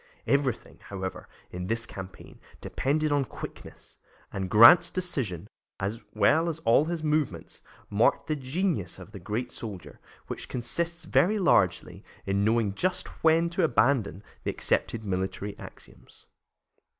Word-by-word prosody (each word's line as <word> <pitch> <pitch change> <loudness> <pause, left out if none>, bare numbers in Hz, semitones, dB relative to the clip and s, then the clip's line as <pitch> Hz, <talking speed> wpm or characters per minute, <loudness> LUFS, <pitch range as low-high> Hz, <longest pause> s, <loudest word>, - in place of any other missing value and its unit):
Everything, 140 -3 -1
however, 95 -2 -6 0.2
in 90 0 -5
this 115 +2 0
campaign, 95 -3 -10 0.2
depended 150 +3 -1
on 145 -1 +2
quickness, - - -10 0.4
and 95 -1 -3
Grant's 115 - +8
decision, 130 - -3 0.3
as 100 +4 -3
well 155 +11 +3
as 160 - -3
all 115 +6 +5
his 165 -1 -3
movements, 150 - -2 0.3
marked 105 +3 +2
the 155 - -1
genius 140 - -2
of 95 +2 -12
the 100 - -9
great 105 +7 -4
soldier, 95 -9 -8 0.3
which - - -7
consists 170 +7 -2
very 210 +5 +3
largely 95 - +2 0.2
in 100 +1 0
knowing 110 -2 +2
just 185 - -1 0.2
when 165 +1 +4
to 180 +1 0
abandon 125 - +2 0.2
the - - -2
accepted 115 -1 -1
military 95 +1 -3
axioms. - - -14
115 Hz, 135 wpm, -27 LUFS, 95-155 Hz, 0.4 s, Grant's